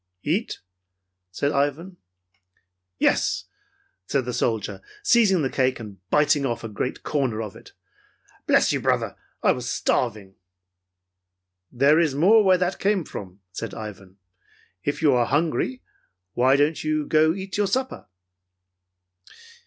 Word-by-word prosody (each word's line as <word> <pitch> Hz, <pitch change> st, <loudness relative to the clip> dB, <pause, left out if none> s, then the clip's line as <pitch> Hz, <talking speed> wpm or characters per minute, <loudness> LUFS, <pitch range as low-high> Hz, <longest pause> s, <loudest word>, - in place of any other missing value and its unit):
"Eat?" 185 Hz, +10 st, -2 dB, 0.7 s
said 140 Hz, +11 st, -1 dB
Ivan. 150 Hz, +6 st, -1 dB, 1.0 s
"Yes," -, -, +1 dB, 0.6 s
said 135 Hz, -3 st, 0 dB
the 125 Hz, -, -4 dB
soldier, 115 Hz, -3 st, -2 dB, 0.2 s
seizing 210 Hz, -, +4 dB
the 135 Hz, -, 0 dB
cake 130 Hz, -1 st, +1 dB
and 105 Hz, -4 st, -10 dB
biting 145 Hz, +1 st, +3 dB
off 120 Hz, -4 st, -2 dB
a -, -, -4 dB
great 110 Hz, +4 st, -4 dB
corner 130 Hz, -7 st, -1 dB
of 105 Hz, -3 st, -5 dB
it. -, -, -15 dB, 0.7 s
"Bless -, -, +4 dB
you, -, -, -1 dB
brother, -, -, 0 dB, 0.3 s
I -, -, +5 dB
was -, -, -3 dB
starving!" 105 Hz, -6 st, -1 dB, 1.4 s
"There 140 Hz, +6 st, +4 dB
is 155 Hz, -5 st, +1 dB
more 205 Hz, +9 st, +5 dB
where 190 Hz, -2 st, +5 dB
that 180 Hz, +1 st, -1 dB
came 200 Hz, -2 st, +1 dB
from," 95 Hz, -7 st, -9 dB
said 115 Hz, +5 st, -6 dB
Ivan. 100 Hz, -3 st, -9 dB, 0.7 s
"If 145 Hz, +3 st, -2 dB
you 145 Hz, -3 st, +5 dB
are 120 Hz, -2 st, +2 dB
hungry, 165 Hz, -, 0 dB, 0.5 s
why 130 Hz, +2 st, +4 dB
don't 145 Hz, +3 st, +1 dB
you 155 Hz, -1 st, 0 dB
go 155 Hz, +2 st, +3 dB
eat 195 Hz, 0 st, -6 dB
your 205 Hz, -1 st, +2 dB
supper." 260 Hz, +6 st, -2 dB
145 Hz, 135 wpm, -24 LUFS, 120-175 Hz, 1.4 s, I